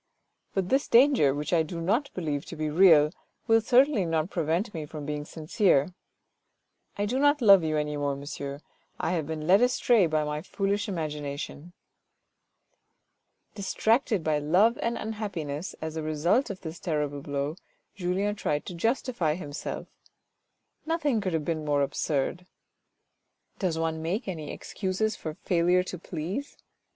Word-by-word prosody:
But 190 -2 0
this 270 +2 +2
danger, 245 - +5
which 150 +4 -3
I 165 - +5
do 165 +2 -4
not 225 - +1
believe 150 -5 -2
to - - -8
be 155 -1 -2
real, 155 -3 +6 0.3
will 225 -1 +4
certainly 250 -1 +4
not 165 0 -1
prevent 170 +5 -1
me 155 -3 -5
from 150 -1 -7
being 150 0 -3
sincere. 160 0 +1 1.0
I 205 - 0
do 250 +6 -1
not 290 +1 +4
love 200 -7 +7
you 155 -1 0
any 150 0 -1
more, 145 -1 -1
monsieur, 140 0 -6 0.4
I 165 - 0
have 165 -5 -1
been 155 -1 -4
led 190 +6 +5
astray 245 -5 +4
by 155 -1 +1
my 150 0 -3
foolish 200 +3 -1
imagination." 150 -1 -5 1.8
Distracted 215 - +1
by 155 -1 +1
love 185 +11 +3
and 230 0 -1
unhappiness, 190 -8 -4
as 160 0 -4
a 160 - -2
result 155 - +1
of 195 -2 -6
this 165 0 -7
terrible 150 -4 -2
blow, 140 +1 -3 0.4
Julien 190 +2 -1
tried 150 -8 -2
to - - -6
justify 225 - 0
himself. 145 -5 -5 1.0
Nothing 300 -8 0
could 185 -3 -2
have 160 -2 -1
been 160 -2 -2
more 145 -1 +2
absurd. 145 +5 -2 1.1
Does 180 -5 0
one 160 -1 -1
make 185 +9 -2
any 160 -6 -5
excuses 200 +2 -2
for 155 -1 -6
failure 180 +1 +2
to 180 -1 -7
please 180 - -5
170 Hz, 150 wpm, -27 LUFS, 150-205 Hz, 1.8 s, love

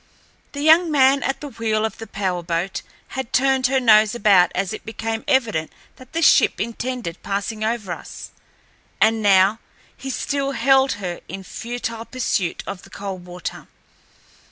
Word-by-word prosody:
The 285 - -5
young 325 +2 +6
man 275 -2 +4
at 270 0 -2
the 295 - -6
wheel 220 -3 -1
of 220 - -5
the 225 - -7
power 185 -3 -2
boat 170 +2 -2 0.3
had 265 -2 -5
turned 265 -1 +3
her 265 +1 +2
nose 220 -2 +5
about 195 -6 +4
as 190 0 -1
it - - -7
became 225 0 -4
evident 230 - +1 0.3
that 255 +2 -16
the 330 0 0
ship - - +5
intended 235 -5 -4
passing 205 +2 -3
over 220 -4 -2
us, - - -8 0.7
and 220 0 +3
now 200 +1 +4 0.4
he 270 - -7
still 275 +1 -2
held 270 +1 +3
her 180 -4 -5
in 195 - -7
futile 230 +2 -5
pursuit 210 -9 -2
of 185 - -6
the - - -16
Coldwater. 180 -3 -7
225 Hz, 155 wpm, -21 LUFS, 195-265 Hz, 0.7 s, young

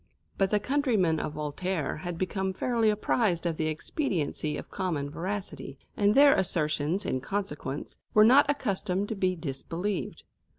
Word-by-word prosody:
But 195 -1 +2
the 210 - +2
countrymen 220 - +1
of 150 - -3
Voltaire 155 +3 -2
had 175 +1 -5
become 190 +1 -1
fairly 230 +1 +1
apprised 210 -4 +1
of 165 -2 -1
the 155 - 0
expediency 155 - -2
of - - -9
common 155 -7 -2
veracity, 185 -6 -5 0.2
and 205 0 +3
their 280 +1 +8
assertions, 155 0 0
in 130 - -1
consequence, 150 -5 -4 0.2
were 215 0 +8
not 275 +5 +6
accustomed 200 -7 -1
to 220 - -2
be 185 -2 +1
disbelieved. 165 +6 -4
185 Hz, 145 wpm, -28 LUFS, 155-210 Hz, 0.2 s, their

